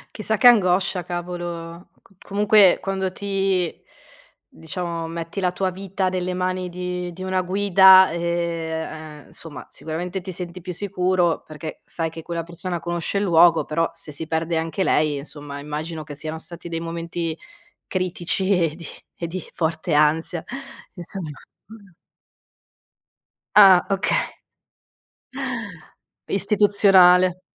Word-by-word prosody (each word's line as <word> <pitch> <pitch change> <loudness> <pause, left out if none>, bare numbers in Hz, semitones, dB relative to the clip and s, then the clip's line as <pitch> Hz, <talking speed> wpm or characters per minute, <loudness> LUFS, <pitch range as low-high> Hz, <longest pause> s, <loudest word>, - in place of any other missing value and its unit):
Chissà 220 0 -1
che 245 - +6
angoscia, 185 -5 +4
cavolo. 175 0 -6
C 195 - -25
comunque 205 -1 +5
quando 190 -1 -2
ti 195 -3 -1 0.8
diciamo, 170 0 -5
metti 165 +3 -5
la 180 -2 +1
tua 185 +1 -1
vita 190 0 -2
nelle 185 0 -2
mani 185 0 -2
di 180 0 -4
di 185 - -11
una 185 0 0
guida, 190 0 +6
ehm, 160 -2 -3
uhm, - - -20
insomma, 165 -3 -11
sicuramente 175 +4 -5
ti 185 +1 -7
senti 180 0 -7
più 180 +1 -6
sicuro 180 -2 0
perché 155 +1 -8
sai 165 -1 -3
che 165 0 -10
quella 170 -1 -3
persona 170 +1 -4
conosce 175 +3 -2
il 205 - 0
luogo, 170 -2 +5
però 165 +2 0
se 165 -2 -11
si 150 +3 -7
perde 165 +1 -1
anche 165 +3 -1
lei, 150 -4 +2
insomma, 145 0 -8
immagino 155 +2 -5
che 145 -1 -9
siano 155 +2 -6
stati 170 +1 -9
dei 165 -1 -3
momenti 165 0 -4 0.5
critici 185 0 -2
e 165 -3 0
di 170 -2 -9 0.4
e - - 0
di 175 +2 -5
forte 160 0 -2
ansia, 160 +3 +2
e - - -6 0.4
insomma. 175 -2 -4 2.3
Ah, 190 -3 +8
oka 195 0 +1 2.1
Istituzionale. 195 -3 +4
175 Hz, 130 wpm, -22 LUFS, 165-185 Hz, 2.3 s, Ah